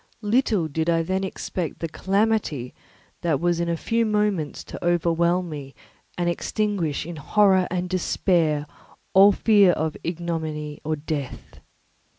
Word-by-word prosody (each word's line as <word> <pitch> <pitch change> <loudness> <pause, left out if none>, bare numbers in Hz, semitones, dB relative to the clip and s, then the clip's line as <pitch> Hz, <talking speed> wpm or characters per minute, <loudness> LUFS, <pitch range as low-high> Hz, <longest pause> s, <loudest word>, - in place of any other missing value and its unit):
Little 210 -5 +2
did 160 +2 -1
I 165 -1 +2
then 190 +3 -1
expect 185 -3 -4
the 165 - -3
calamity 195 - 0 0.5
that 160 -5 +1
was 175 +1 +1
in 170 0 -1
a 170 - 0
few 230 +7 0
moments 210 -8 0
to - - -9
overwhelm 175 +1 +1
me 140 -4 -8 0.4
and 175 -1 0
extinguish 175 -4 -1
in 170 -1 -7
horror 190 +4 +3
and 180 0 -2
despair 170 -4 +1 0.5
all 195 +2 +8
fear 200 -3 +4
of 160 -1 -2
ignominy 160 -3 -4
or 155 +1 -1
death. 145 -3 -6
170 Hz, 140 wpm, -24 LUFS, 155-190 Hz, 0.5 s, all